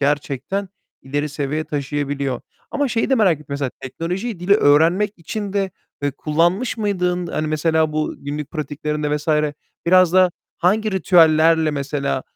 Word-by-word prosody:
gerçekten 145 +6 -1 0.3
ileri 145 +3 -2
seviye 145 +2 -3
taşıyabiliyor. 140 -3 -2 0.3
Ama 290 -2 0
şeyi 230 +1 0
de 265 - +5
merak 205 -8 +4
ettim 150 -1 -15
mesela 140 -2 -2
teknolojiyi 175 - -4
dili 190 +3 +4
öğrenmek 170 +4 +4
için 200 +4 -5
de, 195 -1 0 0.3
eee, 145 - +1
kullanmış 170 - 0
mıydın? 180 -5 -1
Hani, 155 - -2
mesela 155 0 +1
bu 155 0 -1
günlük 145 +1 -5
pratiklerinde 150 -1 -2
vs. 150 +2 -8 0.6
biraz 185 -1 +5
da 185 -1 +5 0.3
hangi 215 +5 +1
ritüellerle 165 -3 +4
mesela, 140 -2 -2
155 Hz, 140 wpm, -20 LUFS, 145-185 Hz, 0.6 s, de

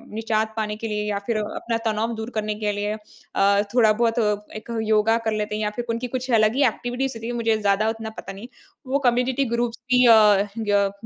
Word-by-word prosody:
निजात 220 0 -1
पाने 210 -1 -2
के 225 - -5
लिए 210 -1 -2
या 200 -1 -1
फ़िर 230 -2 0
अपना 225 +2 -3
तनाव 220 +2 -1
दूर 220 +1 -5
करने 215 -1 -1
के 210 - +1
लिए 205 +1 -2 0.4
अ, 200 +1 +4
थोड़ा 225 -3 +5
बहुत 230 +1 +1 0.4
एक 215 +2 -8 0.2
योगा 220 +1 +3
कर 220 - +1
लेते 210 0 -2
हैं 215 - -2
या 210 - 0
फ़िर 240 - -3
उनकी 230 +2 -2
कुछ 255 0 -5
अलग 215 +2 +3
ही 280 - +3
एक्टिविटीज़ 245 +3 -3
क्यूँकि 230 +2 -5
मुझे 225 -1 +1
ज़्यादा 205 +1 +2
उतना 225 0 -5
पता - - -8
नहीं 200 +5 -10 0.4
वो 275 +2 +1
कम्युनिटी 250 +3 0
ग्रुप्स 240 0 -2
भी 250 0 +5
अ, 210 -3 +6
ग 205 -3 +1
220 Hz, 210 wpm, -23 LUFS, 210-235 Hz, 0.4 s, अ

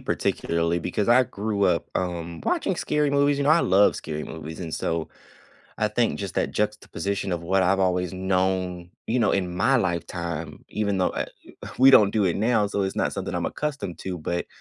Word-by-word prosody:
particularly, 85 +1 0
because 100 +5 -2
I 120 +2 +6
grew 105 -2 -2
up, 85 -3 +1
um, 85 -2 -3
watching - - 0
scary 150 -1 0
movies, 140 0 +2
you 140 - 0
know, 145 - +3
I 165 +2 +6
love 100 - +4
scary 75 0 -5
movies, 80 +1 -8
and 85 -3 -5
so, 80 -1 -2 0.7
I 105 - +3
think 115 +2 0
just 100 -3 -5
that - - 0
juxtaposition 100 -2 -2
of 85 -2 -1
what 95 +3 +2
I've 95 +2 +2
always 90 -2 +1
known, 95 -1 -1 0.2
you 120 +2 +1
know, 105 - +3
in 90 -2 -1
my 115 +9 +3
lifetime, 85 - -3
even 100 -2 -1
though, 90 - +2
uh, - - -3 0.2
u - - -15 0.3
we 135 +1 +8
don't 105 -6 +7
do 105 -1 +1
it 90 - +1
now, 110 -1 +2
so 100 0 -1
it's 95 0 -3
not - - 0
something - - -4
I'm - - -1
accustomed 140 - -4
to, 90 -2 -4
but, 85 +2 -3
95 Hz, 200 wpm, -25 LUFS, 85-105 Hz, 0.7 s, we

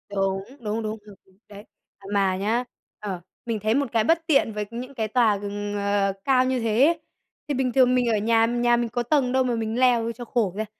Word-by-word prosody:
Đúng, 195 0 0 0.2
đúng, 220 -1 -3
đúng, 215 +1 -4
ừm, 205 -2 -13
ừm, 190 -1 -27
đấy. 205 0 -11 0.3
À, 200 - -19
mà 195 -2 +2
nhá, 220 +5 0 0.4
ờ, 195 -4 -5 0.2
mình 230 -2 -2
thấy 215 +2 +1
một 280 +1 +2
cái 225 -2 +2
bất 330 +6 +2
tiện 275 -8 +3
với 210 0 -3
những 250 +3 -7
cái 220 -4 -2
tòa 220 -2 +2
g 205 - -8 0.3
ờ, 200 -1 +1
cao 255 -2 +3
như 260 0 0
thế 230 +3 +3
ấy. 335 +1 +2 0.5
Thì 290 - -1
bình 255 -2 -1
thường 255 -1 +4
mình 250 -1 +2
ở 220 - +2
nhà, 225 +2 +3
nhà 240 0 +2
mình 235 -1 -1
có 240 +1 -2
tầng 265 -1 +1
đâu 260 0 +2
mà 245 -2 0
mình 225 +1 -2
leo 240 -3 +3
cho 240 +1 -9
khổ 220 -6 0
ra, 215 +1 -2
230 Hz, 240 wpm, -24 LUFS, 210-250 Hz, 0.5 s, thường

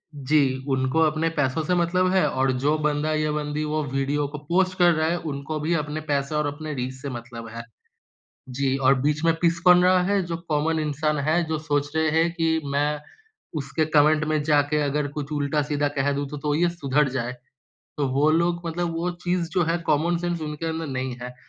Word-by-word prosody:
जी, 135 -2 +1
उनको 130 +3 +1
अपने 160 +1 +2
पैसों 135 +3 +1
से 180 +3 +1
मतलब 180 +1 +2
है 190 - +4
और 130 0 +1
जो 150 +2 +3
बंदा 150 +1 0
या 155 0 0
बंदी 150 0 -2
वो 155 0 -1
वीडियो 140 +1 0
को 150 +1 -7
पोस्ट 185 +1 +1
कर 175 -1 +5
रहा 155 0 +1
है, 170 +2 0
उनको 155 -1 -4
भी 155 +3 0
अपने 150 0 -3
पैसे 140 +1 0
और 150 -1 +1
अपने 150 +1 -5
रीच 130 -1 -3
से 140 - -4
मतलब 120 -2 -8
है। 115 - -5 0.9
जी, 135 +1 0
और 135 0 +4
बीच 150 +2 0
में 165 - +4
पिस 170 0 +2
कौन 180 0 +7
रहा 185 0 +5
है? 200 +1 +1
जो 170 -1 -3
कॉमन 155 +2 +1
इंसान 150 0 -1
है 175 +2 +3
जो 160 - 0
सोच 145 -2 -1
रहे 160 0 +2
हैं 170 +1 +2
कि 165 -2 +1
मैं 145 +1 +1 0.6
उसके 140 +3 -1
कॉमेंट 150 +1 +4
में 155 0 0
जाके 150 0 +2
अगर 145 0 0
कुछ 145 0 -4
उल्टा-सीधा 145 0 0
कह 140 +1 +2
दूँ 140 0 -2
तो 150 - -6
तो 150 +1 -1
ये 175 +3 +2
सुधर 150 -4 0
जाए। 125 -1 -3 0.7
तो 145 - +1
वो 140 +4 +2
लोग 170 +1 +1
मतलब 170 0 -2
वो 175 +2 -1
चीज़ 175 -1 0
जो 180 - +1
है 165 +2 0
कॉमन 160 +4 +2
सेंस 175 -1 -2
उनके 150 +1 -4
अंदर 160 0 -3
नहीं 130 -2 -3
है। 125 0 -7
150 Hz, 210 wpm, -24 LUFS, 140-165 Hz, 0.9 s, कौन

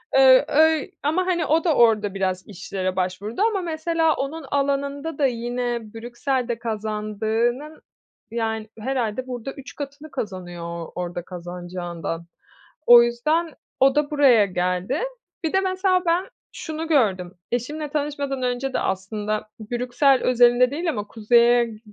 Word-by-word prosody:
Iıı, 260 -1 +7
öy 320 +3 +3
ama 340 +6 +1
hani 345 -4 0
o 320 +2 +2
da 325 -4 +2
orada 215 -4 +4
biraz 185 -1 -2
işlere 185 -1 -4
başvurdu 190 - -3
ama 430 -4 +2
mesela 325 -1 +1
onun 290 +3 -4
alanında 280 +2 -1
da 285 - +2
yine 240 -2 -2
Brüksel'de 240 +1 -2
kazandığının 220 +5 -2 0.5
yani 220 -2 -2
herhâlde 255 0 -2
burada 250 +1 -5
3 275 -1 -11
katını 285 +1 -8
kazanıyor 185 -7 -6
o 170 -1 -6
orada 175 0 -4
kazanacağından. 175 -1 -6 0.6
O 240 0 +9
yüzden, 305 +7 0 0.3
o 270 +1 +5
da 295 0 +1
buraya 260 -8 +5
geldi. 180 - -1 0.4
Bir 320 - -1
de 385 - +4
mesela 370 -1 +1
ben 345 +3 +1 0.3
şunu 320 -1 -5
gördüm, 195 - +1 0.2
eşimle 295 +5 -3
tanışmadan 285 -2 -2
önce 250 +2 -1
de - - +1
aslında 210 +3 -3 0.2
Brüksel 250 +3 +2
özelinde 245 +1 +4
değil 330 +3 -2
ama 205 -7 -3
Kuzey'e 235 +2 +4
g 220 -2 -10
245 Hz, 135 wpm, -23 LUFS, 210-295 Hz, 0.6 s, O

